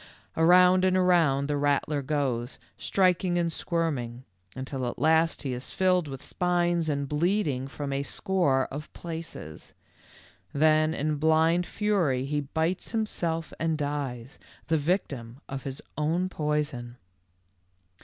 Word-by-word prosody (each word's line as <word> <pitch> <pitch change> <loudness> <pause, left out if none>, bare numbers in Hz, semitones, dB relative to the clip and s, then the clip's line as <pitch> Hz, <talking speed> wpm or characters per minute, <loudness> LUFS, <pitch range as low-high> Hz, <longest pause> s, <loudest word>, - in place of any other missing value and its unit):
Around 180 +2 +6
and 185 0 +3
around 165 -7 +3
the 145 -1 0
rattler 145 +1 +1
goes, 130 -4 -2 0.2
striking 180 -1 +1
and 170 -1 +1
squirming, 135 -10 -2 0.3
until 130 -1 -4
at - - -4
last 160 +4 +2
he 135 -3 -2
is 125 +1 -6
filled 180 -3 +2
with 135 -2 -7
spines 175 -2 0
and 140 -1 -1
bleeding 150 -3 0
from 140 0 -5
a 135 - 0
score 140 -3 +1
of 150 +3 -7
places. 165 - -8 0.8
Then 155 +2 +3
in 150 +1 -1
blind 160 +3 +3
fury 175 -12 0
he 145 +1 -1
bites 160 - -2
himself 170 -7 -1
and 160 -1 0
dies, 140 -4 -4 0.3
the 160 - +3
victim 140 - -2
of 135 0 -6
his 135 0 -5
own 165 +5 0
poison." 150 -7 -2
155 Hz, 130 wpm, -27 LUFS, 135-175 Hz, 0.8 s, Around